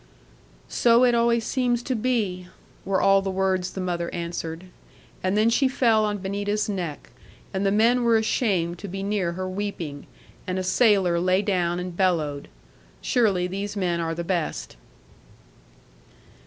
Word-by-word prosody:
'"So 235 +1 +4
it 245 -1 +4
always 235 -1 +2
seems 245 -2 0
to 260 - -2
be," 210 -7 -1 0.4
were 190 0 +1
all 195 0 +4
the 195 - -3
words 190 -1 0
the - - -6
mother' 175 -2 -2
answered; 170 -1 -5 0.6
and 185 +2 0
then 215 +1 +4
she 255 +4 +3
fell 230 -4 +2
on 210 -1 -1
Benita's 205 +2 -2
neck; 180 -8 -5 0.4
and 195 +1 0
the - - +2
men 230 +4 +3
were 230 -1 +4
ashamed 190 -6 0
to 200 - -7
be 195 +1 -5
near 200 -4 -1
her 185 +1 -4
weeping; 185 -7 -5 0.4
and 185 0 -2
a 185 - -1
sailor 190 -4 +3
lay 185 +3 +2
down 180 -4 0
and 180 -1 -5
bellowed. 160 -6 0 0.5
Surely 205 -8 +1
these 200 +3 -4
men 175 -3 0
are 165 -1 -2
the 170 - -3
best. 165 - -3
190 Hz, 155 wpm, -24 LUFS, 175-215 Hz, 0.6 s, So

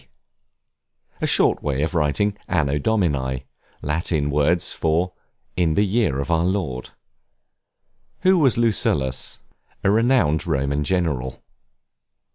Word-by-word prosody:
D.? - - -28 1.1
A - - +1
short - - +3
way 70 0 -1
of 80 - -2
writing 90 +6 +1
Anno 75 -5 0
Domini, 70 - 0 0.4
Latin 75 -1 -1
words 75 +4 +1
for 85 +3 0 0.4
in 85 -3 +1
the 105 - +3
year 100 - +1
of 70 +4 -3
our 80 0 +2
Lord. 85 -9 -2 1.3
Who 185 -1 +4
was 135 -7 +3
Lucullus? 75 - 0 0.5
A 95 - +3
renowned 115 - +2
Roman 70 +2 0
general. 75 -7 -2
80 Hz, 115 wpm, -22 LUFS, 70-95 Hz, 1.3 s, Who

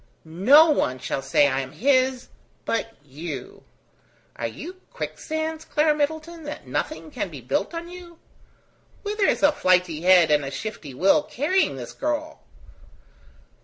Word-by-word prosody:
No 255 - +6
one 130 - 0
shall 130 +1 -3
say 140 +1 +3
I 135 -1 0
am 135 -1 -6
his 260 -1 +1 0.4
but 225 0 -2
you." 145 -1 -7 0.7
"Are 115 - -3
you 350 - -9
quicksands, 315 0 -4
Clara 305 -1 +2
Middleton, 315 +3 -3
that 295 - -7
nothing - - -4
can - - -3
be - - -9
built - - -2
on 335 0 -5
you? 350 -1 -11 0.9
Whither 415 -1 0
is - - +1
a 290 - +7
flighty 180 - +2
head 180 -3 +6
and 150 -1 +3
a 135 - -4
shifty 150 -5 -7
will 190 +8 +4
carrying 305 - 0
the 125 -2 -6
girl?" 300 +1 -3
260 Hz, 145 wpm, -24 LUFS, -, 0.9 s, a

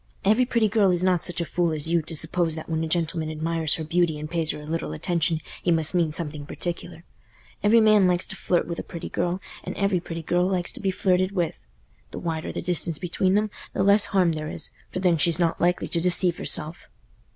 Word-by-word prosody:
Every 220 +5 +4
pretty 235 -3 +2
girl 205 -2 +3
is 180 0 +1
not 180 -2 +2
such 175 -1 -1
a - - -1
fool 170 0 0
as 155 +1 -1
you, 170 -1 +3
to 160 +1 -4
suppose 160 +1 0
that 160 - -7
when 160 -1 -1
a - - -2
gentleman 165 -1 -1
admires 160 0 -1
her 160 - -5
beauty 170 0 +1
and 150 0 -5
pays 165 -1 -1
her - - -2
a 150 - -10
little 160 - -3
attention, 165 - 0 0.2
he - - -1
must 160 -1 +4
mean 170 -3 +2
something 150 -2 -3
particular. 175 0 -5 0.6
Every 225 +2 +5
man 215 -3 +5
likes 180 0 +1
to 195 - -6
flirt 180 -2 0
with 170 -1 -5
a - - -4
pretty 170 - -7
girl, 175 +2 -1 0.2
and - - -6
every 200 -2 +1
pretty 165 -1 -7
girl 175 +3 +1
likes 185 -2 0
to - - +2
be 195 - 0
flirted 185 0 +1
with. 175 -4 -2 0.5
The - - -8
wider 160 -2 -3
the - - -5
distance 170 -2 0
between 185 +2 0
them, 210 0 +1 0.2
the - - 0
less 200 +1 +5
harm 185 -4 +2
there 155 -1 -4
is, 160 - -3 0.2
for - - -6
then 175 -3 +3
she's 165 +1 +3
not 170 -2 0
likely 175 +1 +1
to 170 - 0
deceive 180 0 +2
herself." 155 +4 -2
170 Hz, 230 wpm, -25 LUFS, 160-185 Hz, 0.6 s, Every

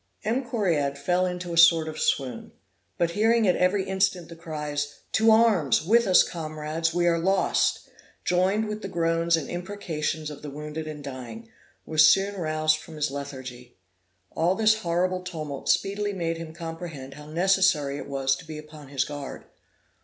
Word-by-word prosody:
M. 240 +5 0
Correard 165 - 0
fell 180 +6 +1
into 180 -1 -5
a - - -3
sort 165 -1 +6
of 155 0 -6
swoon; 130 -4 -1 0.4
but 170 -1 +1
hearing 225 +3 +3
at 180 - +4
every 190 +2 +2
instant 190 -2 0
the 165 - -9
cries, 150 -3 -4 0.2
To 220 +1 +4
Arms! 215 - +4
with 230 +4 +4
us 185 - +7
comrades; 155 0 -3
we 175 +1 +1
are 170 -1 +3
lost! 190 +3 +1 0.4
joined 190 +5 +2
with 210 0 -5
the 195 - -5
groans 165 -1 +1
and 150 - -4
imprecations 165 -4 -4
of 145 - -10
the 150 - -7
wounded 150 +2 -6
and 150 -2 -7
dying, 140 - -8 0.4
was 155 -1 +5
soon 195 +1 +1
roused 155 -4 +1
from 160 +1 -12
his 150 -2 -1
lethargy. 130 -3 -8 0.5
All 175 +3 +1
this 220 0 +3
horrible 180 0 0
tumult 155 -6 -6
speedily 205 +1 +1
made 165 -3 -2
him 165 -1 -7
comprehend 165 -4 -7
how 150 +1 -12
necessary 165 -4 +2
it - - -8
was 135 -1 +1
to - - -12
be 155 -1 -7
upon 150 -1 -11
his 135 -1 -1
guard. 145 -2 -7
165 Hz, 170 wpm, -26 LUFS, 150-185 Hz, 0.5 s, us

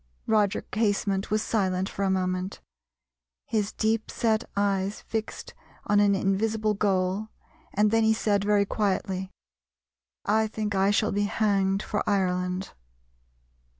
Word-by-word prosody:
Roger 210 -3 +2
Casement 200 -2 0
was 215 +1 +1
silent 190 -3 0
for 200 - -6
a 195 - +2
moment, 185 0 -1 0.9
his 210 -2 -1
deepset 220 0 0
eyes 200 0 0
fixed 220 -1 -5 0.3
on 205 0 +3
an 200 -1 +4
invisible 215 +3 +1
goal, 195 0 0 0.5
and 210 +1 +3
then 225 0 +3
he 220 - +4
said 205 -2 +1
very 205 0 +3
quietly, 190 -2 -1 1.0
"I 220 +1 +2
think 215 -1 -3
I 195 0 +3
shall 210 +1 +2
be 205 +1 +1
hanged 195 -2 +1
for 210 - -2
Ireland." 180 -1 -1
205 Hz, 125 wpm, -27 LUFS, 190-215 Hz, 1.0 s, an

